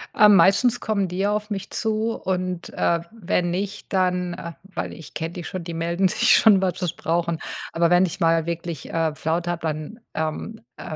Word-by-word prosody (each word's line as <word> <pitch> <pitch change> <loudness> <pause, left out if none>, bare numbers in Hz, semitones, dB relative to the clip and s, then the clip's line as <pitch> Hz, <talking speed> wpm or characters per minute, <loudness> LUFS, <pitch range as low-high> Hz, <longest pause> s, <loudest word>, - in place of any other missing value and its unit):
Äh, 210 - +7
meistens 200 +6 +5
kommen 200 -3 0
die 180 +1 -5
ja 200 +1 +2
auf 210 0 -2
mich 200 -2 -4
zu 220 +1 0
und, 185 -3 -3
äh, 170 - +1
wenn 180 -5 -1
nicht, 200 +3 -4
dann, 180 -1 +1
äh 170 -1 -6
weil 195 0 -5
ich 160 - -12
kenne 160 +1 -3
die 175 - -6
schon, 185 +1 -5
die 170 0 -6
melden 170 +3 +1
sich - - +4
schon, 205 -4 +6
wenn 185 -2 +1
sie's 180 -1 -3
brauchen. 170 0 -1 0.3
Aber 170 0 +2
wenn 180 +2 +5
ich 175 - -5
mal 165 -1 +3
wirklich, 170 -2 -5
äh, 160 -2 0
Flaute 165 +3 -1
habe, 170 - -4
dann, 155 +8 -5
ähm, 160 +8 -4 0.2
äh, 155 - -6
180 Hz, 205 wpm, -23 LUFS, 165-195 Hz, 0.3 s, Äh